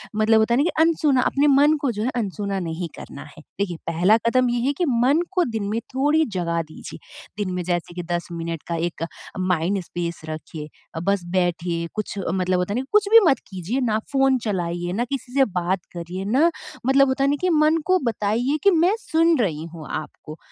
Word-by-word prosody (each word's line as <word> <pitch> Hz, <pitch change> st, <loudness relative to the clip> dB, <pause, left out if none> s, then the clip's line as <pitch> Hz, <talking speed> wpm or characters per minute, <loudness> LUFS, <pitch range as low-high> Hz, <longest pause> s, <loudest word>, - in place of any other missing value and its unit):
मतलब 220 Hz, +1 st, +4 dB
होता 220 Hz, +2 st, +2 dB
है -, -, +3 dB
ना -, -, +4 dB
कि 320 Hz, -1 st, 0 dB
अनसुना 300 Hz, -5 st, +2 dB
अपने 285 Hz, +3 st, +2 dB
मन 295 Hz, +2 st, +5 dB
को 270 Hz, -4 st, +1 dB
जो 210 Hz, 0 st, -3 dB
है 250 Hz, -, 0 dB
अनसुना 200 Hz, -3 st, -2 dB
नहीं 165 Hz, +1 st, -4 dB
करना 140 Hz, -, -9 dB
है। -, -, -11 dB, 0.2 s
देखिए 180 Hz, -4 st, -1 dB
पहला 180 Hz, +7 st, +4 dB
कदम 255 Hz, 0 st, +2 dB
ये 240 Hz, 0 st, 0 dB
है 285 Hz, -, +2 dB
कि 350 Hz, -, +2 dB
मन 260 Hz, +6 st, +3 dB
को 365 Hz, -2 st, +2 dB
दिन 200 Hz, -, -3 dB
में 225 Hz, +2 st, -1 dB, 0.2 s
थोड़ी 295 Hz, +4 st, +3 dB
जगह 170 Hz, -1 st, 0 dB
दीजिए -, -, -10 dB, 0.4 s
दिन 185 Hz, -2 st, -4 dB
में 180 Hz, -, -2 dB
जैसे 175 Hz, -1 st, -2 dB
कि 175 Hz, -, -4 dB
10 175 Hz, 0 st, -2 dB
मिनट 165 Hz, -1 st, -5 dB
का 170 Hz, -, -2 dB
एक 165 Hz, 0 st, -3 dB, 0.4 s
माइंड 185 Hz, +1 st, 0 dB
स्पेस 170 Hz, -1 st, -5 dB
रखिए, 155 Hz, -1 st, -7 dB, 0.3 s
अ, -, -, -2 dB
बस 200 Hz, -1 st, +1 dB
बैठिए, 175 Hz, -2 st, 0 dB
कुछ 215 Hz, -1 st, -4 dB
अ, -, -, -2 dB
मतलब 185 Hz, -1 st, +1 dB
होता 180 Hz, +3 st, -1 dB
है 245 Hz, -, 0 dB
ना 265 Hz, -, -4 dB
कुछ 420 Hz, -1 st, +3 dB
भी 455 Hz, -, +10 dB
मत 270 Hz, -5 st, +3 dB
कीजिए 195 Hz, +7 st, -3 dB
ना 220 Hz, -3 st, +1 dB
फ़ोन 270 Hz, -1 st, +3 dB
चलाइए, 175 Hz, -3 st, -2 dB
ना 240 Hz, +4 st, 0 dB
किसी 255 Hz, -1 st, -6 dB
से 275 Hz, -1 st, +4 dB
बात 180 Hz, -1 st, -1 dB
करिए 175 Hz, +2 st, -5 dB
ना 275 Hz, +11 st, +3 dB, 0.4 s
मतलब 275 Hz, 0 st, +5 dB
होता 270 Hz, +1 st, 0 dB
है 275 Hz, -, +3 dB
ना -, -, +2 dB
कि 365 Hz, -, +2 dB
मन 310 Hz, 0 st, +4 dB
को 370 Hz, 0 st, +4 dB
बताइए 235 Hz, +5 st, 0 dB
कि 400 Hz, -, +6 dB
मैं 350 Hz, +5 st, +3 dB
सुन 330 Hz, -4 st, +2 dB
रही 160 Hz, -8 st, -1 dB
हूँ 160 Hz, -2 st, -9 dB
आपको। 155 Hz, 0 st, -7 dB
210 Hz, 220 wpm, -23 LUFS, 175-275 Hz, 0.4 s, भी